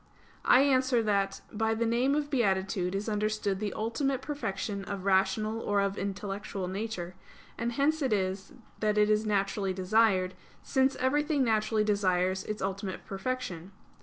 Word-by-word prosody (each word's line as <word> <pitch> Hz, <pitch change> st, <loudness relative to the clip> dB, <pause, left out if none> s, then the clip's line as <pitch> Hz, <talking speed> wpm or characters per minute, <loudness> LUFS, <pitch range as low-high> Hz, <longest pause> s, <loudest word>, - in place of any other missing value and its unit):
I 255 Hz, -, +7 dB
answer 260 Hz, -3 st, +3 dB
that, 200 Hz, -2 st, 0 dB
By 220 Hz, +1 st, +1 dB
the 230 Hz, +1 st, 0 dB
name 245 Hz, +5 st, +2 dB
of 295 Hz, -1 st, -2 dB
beatitude 195 Hz, -6 st, +1 dB
is 200 Hz, +3 st, -2 dB
understood 210 Hz, -2 st, -1 dB
the 210 Hz, -1 st, -2 dB
ultimate 260 Hz, +4 st, -1 dB
perfection 210 Hz, -8 st, -3 dB
of 200 Hz, -2 st, -5 dB
rational 195 Hz, +3 st, +2 dB
or 205 Hz, -2 st, 0 dB
of 200 Hz, 0 st, 0 dB
intellectual 200 Hz, -1 st, -4 dB
nature; 190 Hz, -2 st, -4 dB, 0.4 s
and 235 Hz, +1 st, -2 dB
hence 305 Hz, +5 st, +1 dB
it 265 Hz, -4 st, +1 dB
is 190 Hz, -1 st, -1 dB, 0.3 s
that 210 Hz, -1 st, +1 dB
it 210 Hz, 0 st, +4 dB
is 215 Hz, +1 st, +2 dB
naturally 195 Hz, -1 st, 0 dB
desired, 185 Hz, -1 st, +2 dB, 0.3 s
since 265 Hz, 0 st, +2 dB
everything 290 Hz, +2 st, +1 dB
naturally 215 Hz, -2 st, +2 dB
desires 190 Hz, -3 st, +1 dB
its 215 Hz, -2 st, -4 dB
ultimate 195 Hz, 0 st, -4 dB
perfection. 195 Hz, -4 st, -4 dB
210 Hz, 150 wpm, -29 LUFS, 195-235 Hz, 0.4 s, I